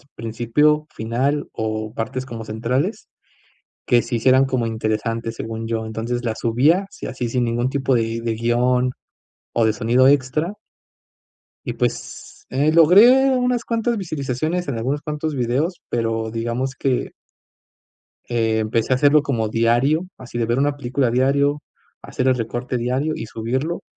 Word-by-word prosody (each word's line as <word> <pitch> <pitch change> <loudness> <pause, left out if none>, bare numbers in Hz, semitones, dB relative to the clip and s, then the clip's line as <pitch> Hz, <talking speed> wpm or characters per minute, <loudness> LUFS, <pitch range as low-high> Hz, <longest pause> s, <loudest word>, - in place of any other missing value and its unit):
principio, 120 +7 +1
final 130 +6 -1
o 110 0 -3
partes 130 +3 -4
como 115 -4 -7
centrales, 125 - -2 0.8
que 120 -1 +4
se 120 +1 -4
hicieran 130 +3 +4
como 130 -3 -1
interesantes 115 +1 -2
según 115 0 -5
yo. 115 -1 -2
Entonces 115 +2 -3
las 110 -1 -2
subía, 145 - +3
sí - - -10
así 125 -1 -3
sin 125 +1 0
ningún 120 +2 0
tipo 135 -1 0
de 115 0 -1
de 115 -1 -1
guion 125 +2 +1 0.7
o 115 - +4
de 110 - +3
sonido 120 +5 +3
extra. 145 +6 +1 1.2
Y - - -1
pues - - -4
eh, 140 +5 +2
logré 235 - +6
unas 250 -1 0
cuantas 230 0 0
visualizaciones 155 -1 -2
en 130 -5 -2
algunos 135 +6 -2
cuantos 150 0 -3
videos, 135 +8 -1
pero 115 -1 -1
digamos 120 +4 -3
que 135 -2 -1 1.2
empecé 115 0 +1
a - - +3
hacerlo 145 +3 +4
como 115 -7 -1
diario, 120 +10 +2
así 125 -2 -8
de 115 - +1
ver 120 +2 0
una 145 0 +1
película 130 -1 0
diario, 140 +3 +2 0.4
hacer 130 - -2
el 130 - +4
recorte 120 +2 -3
diario 130 +6 -1
y - - -5
subirlo. 130 +10 -3
125 Hz, 150 wpm, -21 LUFS, 115-145 Hz, 1.2 s, logré